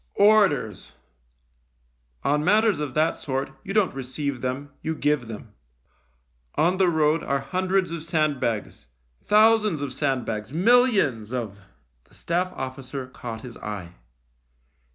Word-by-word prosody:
" - - -45 0.2
Orders! 145 - +1 1.3
On 150 +1 +1
matters 210 +3 +3
of 145 -4 -4
that 155 +1 +2
sort 135 -1 -3
you 195 - -6
don't 200 -3 +2
receive 135 0 -4
them; 130 +3 -3
you 160 0 -2
give 145 -5 0
them. 110 -1 -9 1.0
On 175 +4 +2
the 185 -2 +4
road 160 -1 +2
are 140 - 0
hundreds 185 +5 0
of 170 -1 -4
sandbags, 150 - -1 0.4
thousands 215 -4 +4
of 135 -2 -4
sandbags, 125 -6 -2
millions 185 - +3
of 115 -6 -3 0.3
" - - -43
The - - -21
Staff 180 +2 -1
officer 130 0 -6
caught 115 -3 -8
his 120 -1 -10
eye. 100 -5 -6
145 Hz, 135 wpm, -25 LUFS, 125-180 Hz, 1.3 s, the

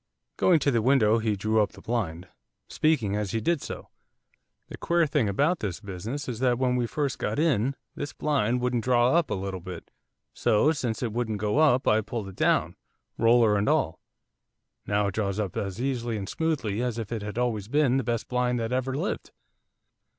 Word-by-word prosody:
Going 180 -3 +4
to 140 - +2
the 115 -3 +2
window 115 -3 +4
he 110 -2 0
drew 110 +2 +1
up 105 - -1
the - - -13
blind, 95 -7 -3 0.4
speaking 130 -11 +1
as 105 -2 -2
he 115 - +1
did 165 +6 0
so. - - -7 0.8
'The - - -9
queer 170 -1 +2
thing 140 -7 +1
about 145 - +1
this 100 -7 -3
business 105 +7 -6
is 120 -3 -4
that 125 -2 +2
when 125 0 +1
we 120 -1 0
first 145 0 -2
got 105 - -2
in 140 -5 +1 0.2
this 145 - -5
blind 125 -5 0
wouldn't 125 -2 0
draw 125 0 +3
up 170 -1 +2
a - - -1
little 95 -1 -4
bit, 90 -1 -9 0.4
so, 125 +9 +3
since 125 -7 -2
it 115 -3 -2
wouldn't 115 -2 -1
go 105 +7 0
up 140 -5 +4
I 110 +1 +4
pulled 110 -2 -5
it 95 - -12
down, - - +1 0.4
roller 115 -2 +5
and 105 +1 +1
all, - - +1 0.9
now 105 0 +1
it 100 - -1
draws 100 -1 -1
up 100 -5 -3
as 100 +1 -3
easily 120 -3 -2
and 100 -2 -5
smoothly 130 -10 -1
as 125 -2 -2
if 115 -2 -5
it 115 -3 -2
had 105 +2 -6
always 115 -5 -1
been 135 0 +2
the 135 - 0
best 115 0 -2
blind 125 -1 0
that 115 0 -3
ever 130 +1 -1
lived. 175 +7 -3
115 Hz, 200 wpm, -27 LUFS, 105-130 Hz, 0.9 s, roller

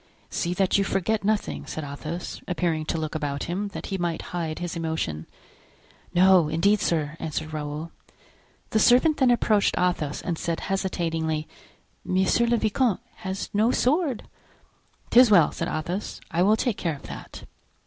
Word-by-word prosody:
"See 175 0 -1
that 195 +1 +2
you - - +3
forget 200 +2 0
nothing," 210 +1 -1
said 155 - -5
Athos, 150 +4 -6
appearing 170 -3 -1
to 165 - -2
look 155 -1 -3
about 145 -2 -2
him, 190 +4 -2
that 200 - -7
he 190 - -1
might 170 -2 -2
hide 165 -3 -2
his 175 -1 -4
emotion. 160 - -3 0.8
"No, 180 -2 +5
indeed, 200 +7 +3
sir," 160 -5 0
answered 155 0 -4
Raoul. 150 +2 -4 0.8
The 220 - +3
servant 255 +7 +5
then 260 -2 +4
approached 215 -4 +2
Athos 165 -5 0
and 170 -2 -2
said, 170 -1 -2
hesitatingly: 165 -5 -1 0.6
"Monsieur 190 +6 +2
le 235 0 +3
vicomte 220 0 +1 0.2
has 195 -2 -5
no 215 +3 +3
sword." 275 0 +1 0.9
"'Tis 245 0 +7
well," 175 -7 +6
said - - -3
Athos, 175 +6 -3
"I 170 - +1
will 210 +4 +4
take 235 -2 0
care 165 -3 -1
of 140 - -14
that." - - -9
175 Hz, 160 wpm, -25 LUFS, 160-205 Hz, 0.9 s, Tis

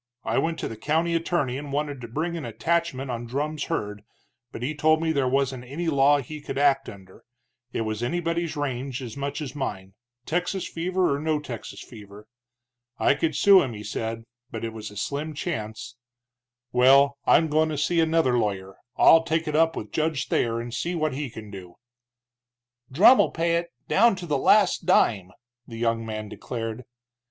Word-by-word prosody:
I - - 0
went 165 0 -1
to - - -3
the 115 - -7
county 160 +7 0
attorney 165 -6 0
and 145 -1 -8
wanted 145 -2 -2
to 120 - -7
bring 160 +9 -3
an 165 - -5
attachment 140 +2 -1
on 120 0 -5
Drumm's 150 +5 -2
herd, 105 -11 -3 0.5
but 120 - -7
he 140 +5 -1
told 155 +1 +3
me 165 0 0
there 140 -4 +1
wasn't 135 -1 0
any 155 +7 -3
law 140 0 +4
he 150 +3 -7
could 135 - -6
act 140 -1 +2
under, 95 -2 -14 0.5
it - - -2
was 110 0 -3
anybody's 170 +4 -1
range 135 -2 -3
as 115 -3 -7
much 140 +2 -4
as 135 -4 -5
mine, 95 -9 -5 0.3
Texas 180 +3 -2
fever 180 -2 0
or - - -4
no 155 0 0
Texas 125 -6 -8
fever. 105 -2 -13 0.7
I - - +3
could 155 +1 -1
sue 200 +3 +7
him, 130 -4 -3
he 105 - -8
said, 115 +1 -4 0.3
but 115 -2 -5
it 115 - -5
was 110 -1 -7
a 105 - -12
slim 145 +7 -3
chance. 115 -7 -5 0.7
Well, 135 +3 +5
I'm 160 - +5
goin' 155 +1 +2
to 155 - -3
see 170 +4 +1
another 160 -6 +2
lawyer 95 -3 -3 0.2
I'll 165 - +7
take 165 0 -1
it 150 - -2
up 165 +1 +3
with 105 -1 -6
Judge 155 -4 -1
Thayer, 115 0 +1
and 120 0 -6
see 175 +8 -2
what 155 -3 0
he 140 0 -4
can 110 -2 -10
do." 90 -3 -10 1.2
"Drumm'll 200 - +6
pay 170 0 0
it, 170 0 -3 0.2
down 230 0 +4
to 180 - -7
the 145 -4 0
last 205 +3 +3
dime!" 95 -5 +3 0.4
the 115 - -9
young 115 0 0
man 110 -1 -5
declared. 115 +2 -6
140 Hz, 185 wpm, -25 LUFS, 115-160 Hz, 1.2 s, sue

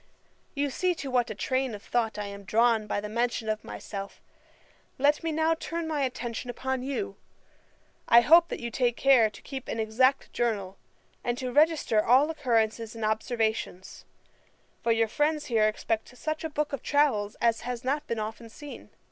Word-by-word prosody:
'You 285 0 0
see 360 +6 0
to 280 -5 -6
what 245 -2 +2
a 215 - -5
train 260 +1 -1
of 205 - -11
thought 230 -3 -1
I 210 - -3
am 200 0 -8
drawn 220 +1 +2
by 205 - -1
the 210 - -5
mention 235 +1 -1
of 215 0 -2
myself. 200 -1 -7 0.8
Let 290 +2 +3
me 330 -1 -2
now 320 +1 +2
turn 330 0 -4
my 305 -2 -1
attention 245 -2 -3
upon 260 +1 -2
you. 280 +10 -4 0.9
I 235 - +8
hope 335 +6 +6
you 235 0 -4
take 240 -1 0
care 260 -5 +5
to 210 - -14
keep 265 -2 -7
an 225 - -3
exact 255 +5 +2
journal, 205 -5 -2 0.4
and 240 0 -1
to 255 -2 -3
register 295 -8 +3
all 265 +6 +4
occurrences 230 -6 0
and 225 -1 -3
observations; 220 -3 -2 0.8
for 235 - +1
your 225 0 +3
friends 295 +5 0
here 220 -3 +3
expect 225 +3 -3
such 310 +3 -3
a 320 - -2
book 295 -1 -2
of 280 - -3
travels 265 -9 +1
as 230 -1 +2
has 245 0 -5
not 290 +4 -1
been 230 - -2
often 220 +2 -5
seen. 290 +5 -10
240 Hz, 180 wpm, -28 LUFS, 220-285 Hz, 0.9 s, I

